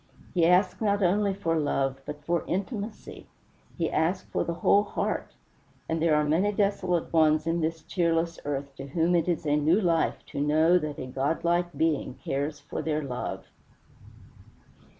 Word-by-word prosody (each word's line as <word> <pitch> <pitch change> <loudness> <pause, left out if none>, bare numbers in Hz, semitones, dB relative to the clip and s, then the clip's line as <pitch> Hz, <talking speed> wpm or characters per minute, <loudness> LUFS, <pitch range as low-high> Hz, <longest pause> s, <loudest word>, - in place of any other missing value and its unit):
He 170 -2 +3
asked 185 +4 +3
not 205 -2 +1
only 200 +3 +2
for 165 -4 -1
love, 135 -2 -1
but 150 0 -7
for 170 0 0
intimacy 205 +3 -5 0.5
he 165 -3 -1
asked 170 +4 0
for - - 0
the 170 - -3
whole 200 +4 +4
heart; 205 - -3 0.5
and 160 0 -1
there 160 -2 +3
are 150 - +3
many 165 +8 +2
desolate 195 -5 0
ones 155 -1 +4
in 165 +1 0
this 160 0 -2
cheerless 170 -2 0
earth 140 -1 -4
to 135 - -7
whom 165 +4 +1
it 170 -1 +1
is 170 -3 -1
a 145 -1 +2
new 155 +6 +3
life 170 -5 0
to 140 - -3
know 155 +4 +4
that 150 -2 -5
a 130 - -5
godlike 165 +7 0
Being 155 -5 0
cares 145 +3 -3
for - - -5
their 155 -1 -1
love. 125 -3 -5
165 Hz, 170 wpm, -27 LUFS, 150-180 Hz, 0.5 s, whole